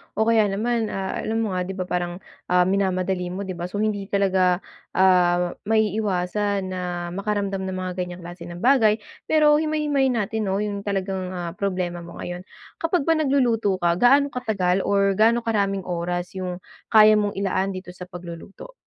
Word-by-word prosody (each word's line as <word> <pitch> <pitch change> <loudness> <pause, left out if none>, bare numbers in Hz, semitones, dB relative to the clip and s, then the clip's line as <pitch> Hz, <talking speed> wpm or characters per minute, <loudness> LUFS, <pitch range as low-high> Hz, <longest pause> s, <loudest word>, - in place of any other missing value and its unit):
o 220 - +2
kaya 225 -2 +4
naman, 225 +3 0
ah, 195 -1 -3
alam 225 +1 -1
mo 210 - -2
nga 180 0 -2
di 190 - -5
ba, 185 - -2
parang, 180 0 -3 0.2
ah, 180 0 +4
minamadali 185 -1 0
mo, 185 +3 -4
di 190 - -5
ba? 175 0 -5
So, 205 +3 -2
hindi 205 -2 -1
talaga, 190 -2 +2 0.3
ah, 180 -2 +4 0.2
maiiwasan 205 -2 0
na 175 -1 -4
makaramdam 200 -1 -2
ng 190 - -3
mga 185 - -3
ganyang 180 -1 -5
klase 175 +2 -9
ng 175 +3 -8
bagay. 235 -5 +5 0.3
Pero 300 -1 +5
himay-himayin 295 -4 +1
natin, 220 0 -1
no, 195 +2 0
yung 205 -1 -3
talagang, 190 -2 -3
ah, 175 -1 -4
problema 180 -2 -2
mo 170 0 -10
ngayon. 175 +1 -7 0.3
Kapag 330 -1 +1
ba 330 - +2
nagluluto 255 -9 +2
ka, 175 -1 0
gaano 275 +3 +5
katagal 195 -7 0
or 200 0 +3
gaano 230 +2 +4
karaming 200 -4 0
oras 175 0 -3
yung 185 -1 -5 0.2
kaya 215 -1 +6
mong 205 -1 -1
ilaan 195 0 -1
dito 185 -1 -8
sa 180 0 -10
pagluluto? 180 - -10
195 Hz, 175 wpm, -23 LUFS, 180-215 Hz, 0.3 s, kaya